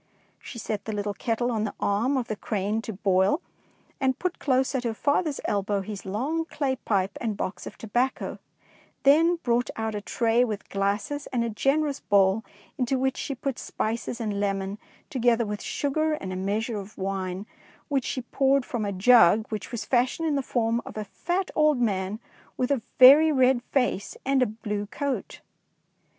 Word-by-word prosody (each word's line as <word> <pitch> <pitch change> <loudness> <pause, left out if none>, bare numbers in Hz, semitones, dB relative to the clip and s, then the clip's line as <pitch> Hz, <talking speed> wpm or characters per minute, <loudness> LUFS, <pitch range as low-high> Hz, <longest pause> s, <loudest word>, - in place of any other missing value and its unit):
She 245 - -9
set 210 -2 -4
the 205 -1 -2
kettle 240 +1 0
on 220 -2 0
the 215 - -3
arm 230 +7 +1
of 245 -2 -2
the 215 - -2
crane 210 +1 -2
to 225 - -6
boil, 190 - +2 0.6
and 260 -2 +1
put 365 -1 -3
close 265 -1 +1
at 260 -2 -1
her 230 -2 -2
father's 290 +3 0
elbow 200 0 0
his 195 0 -7
long 280 +12 -1
clay 275 -5 -2
pipe 195 -3 -1
and 220 -4 -2
box 185 - -4
of - - -9
tobacco, 240 +4 -1 0.6
then 325 +5 +5
brought 240 0 +1
out 220 0 -2
a 205 - -3
tray 230 +3 +2
with 215 -4 -4
glasses 200 +9 -1
and 240 -2 -1
a 230 - -2
generous 280 +5 +1
bowl, 200 +1 +3 0.4
into 255 +1 +1
which 265 +1 0
she 275 - -4
put 265 0 -3
spices 230 +2 -3
and 210 -3 -2
lemon, 195 0 -2 0.3
together 240 -4 +2
with 210 0 -4
sugar 310 +2 0
and 190 -11 -4
a - - -4
meas 200 +4 -1
ure 225 -4 -3
of 200 +2 -13
wine 190 0 -3 0.4
which 275 -4 0
she 255 - -2
poured 270 +1 +2
from 230 -4 -3
a 200 - -1
jug 210 0 +6
which 215 0 -5
was 235 - -4
fashioned 255 +6 +1
in 305 - +1
the 275 - +1
form 235 -2 0
of - - -9
a 215 - -2
fat 355 - -2
old 305 -4 +3
man 200 -2 0 0.4
with 250 +2 0
a 275 -4 +1 0.2
very 290 +5 +9
red 260 -3 +4
face 245 -7 0
and 270 0 +2
a 255 - +4
blue 210 -1 -4
coat. 280 +4 -4
235 Hz, 185 wpm, -26 LUFS, 205-265 Hz, 0.6 s, very